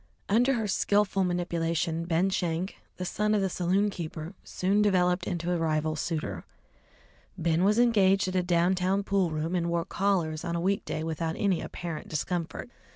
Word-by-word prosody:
Under 245 +6 +3
her 225 -4 -1
skilful 200 0 +2
manipulation, 170 -2 -1
Ben 175 +3 +1
Schenk, 175 0 -2 0.2
the 180 - -4
son 210 +3 0
of 205 - +2
the 190 -1 0
saloon 190 +4 +1
keeper, 160 -1 -6
soon 195 +3 +1
developed 180 -3 +2
into 175 0 -2
a 175 - 0
rival 155 -1 0
suitor. 150 - -3 0.9
Ben 165 +1 +1
was 210 +3 +3
engaged 200 -5 +4
at 185 - -3
a 185 - +3
down 175 0 +2
town 190 +2 +1
pool 195 -3 +1
room, 155 +2 -2
and 170 -1 0
wore 170 0 0
collars 170 -5 0
on 170 -1 -2
a - - 0
weekday 185 -3 -1
without 160 0 -2
any 195 -5 +1
apparent 170 -3 -6
discomfort. 165 +1 -3
180 Hz, 170 wpm, -28 LUFS, 165-195 Hz, 0.9 s, engaged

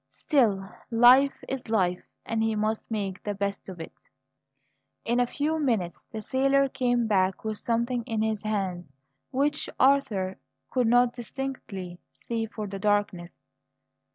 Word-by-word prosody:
Still, 215 -10 +2 0.2
life 250 +4 +5
is 265 -4 -5
life, 185 -5 +1 0.2
and 225 -1 -1
he 220 0 +1
must 215 +1 -1
make 200 -4 -3
the 205 -1 -3
best 200 0 -3
of 180 -2 -8
it. 165 - -8 1.1
In 240 +1 +1
a 245 - +3
few 310 +5 -1
minutes 220 - -1
the 220 -1 -7
sailor 275 +3 +3
came 245 -3 +1
back 190 -3 +1
with 215 -1 -3
something 235 +1 0
in 220 -1 0
his 220 -2 -1
hands 185 -7 -3 0.4
which 290 +3 0
Arthur 220 -9 +2 0.3
could 250 -3 +2
not 245 +1 +4
distinctly 230 -8 -6
see 225 -1 -4
for 215 -1 -6
the 195 -1 -6
darkness. 205 -4 -1
220 Hz, 145 wpm, -27 LUFS, 195-250 Hz, 1.1 s, life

